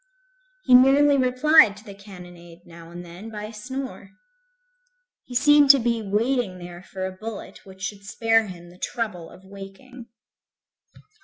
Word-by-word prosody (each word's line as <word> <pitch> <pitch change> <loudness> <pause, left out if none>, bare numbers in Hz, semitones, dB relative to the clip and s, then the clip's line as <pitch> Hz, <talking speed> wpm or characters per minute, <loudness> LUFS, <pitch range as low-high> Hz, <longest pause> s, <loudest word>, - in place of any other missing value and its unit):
He - - +2
merely 275 +3 +6
replied 255 -3 +4
to 205 - -15
the 205 -3 -11
cannonade, 175 -3 -14
now 165 -1 -14
and 175 +1 -10
then, 175 +6 -11
by 210 -2 -8
a 215 +2 -8
snore. 240 -3 -8 1.1
He 250 - -11
seemed 290 +2 +5
to 275 -1 +8
be 235 -1 -1
waiting 215 0 -1
there 175 0 -10
for 185 0 -7
a 190 - -4
bullet 210 +1 -10
which 190 0 -13
should 205 -1 -6
spare 225 +2 +1
him 175 -2 -11
the 180 - -19
trouble 200 -9 -5
of 190 - -17
waking. 200 +6 -12
210 Hz, 155 wpm, -23 LUFS, 185-250 Hz, 1.1 s, to